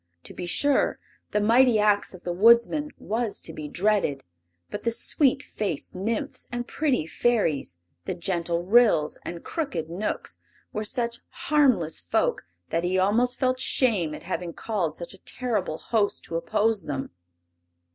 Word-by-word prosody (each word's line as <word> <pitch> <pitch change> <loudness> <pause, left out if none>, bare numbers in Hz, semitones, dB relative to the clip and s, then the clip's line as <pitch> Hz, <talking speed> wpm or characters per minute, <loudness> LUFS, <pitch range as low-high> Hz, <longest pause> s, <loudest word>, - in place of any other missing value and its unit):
To - - -8
be 180 - -6
sure 285 +10 +3 0.3
the 210 - +1
mighty 230 +3 +5
ax 210 -2 +2
of 185 - -14
the 175 - -2
Woodsman 235 +9 +4
was 225 0 -2
to 160 - -6
be 150 -1 -6
dreaded, 185 -6 +1 0.5
but - - -4
the 235 - +1
sweet 275 +4 +2
faced 195 -9 -3
Nymphs 215 +5 -3
and 240 0 -3
pretty 280 - 0
Fairies, 160 - 0 0.3
the - - -3
gentle 170 -1 -1
Ryls 195 -7 +4
and 170 -1 -6
crooked 175 - -3
Knooks 195 +5 -4 0.3
were 215 - -2
such 235 0 -2
harmless 260 - +2
folk 85 0 0 0.2
that 165 +1 0
he 180 +1 +1
almost 225 +7 +2
felt 255 -1 +1
shame 205 - +2
at - - -10
having 175 -2 -4
called 180 -9 -2
such 170 - -7
a 195 - -15
terrible 210 -11 -2
host 210 0 0
to 165 - -7
oppose 205 +3 0
them. 135 -2 -4
205 Hz, 155 wpm, -26 LUFS, 170-240 Hz, 0.5 s, mighty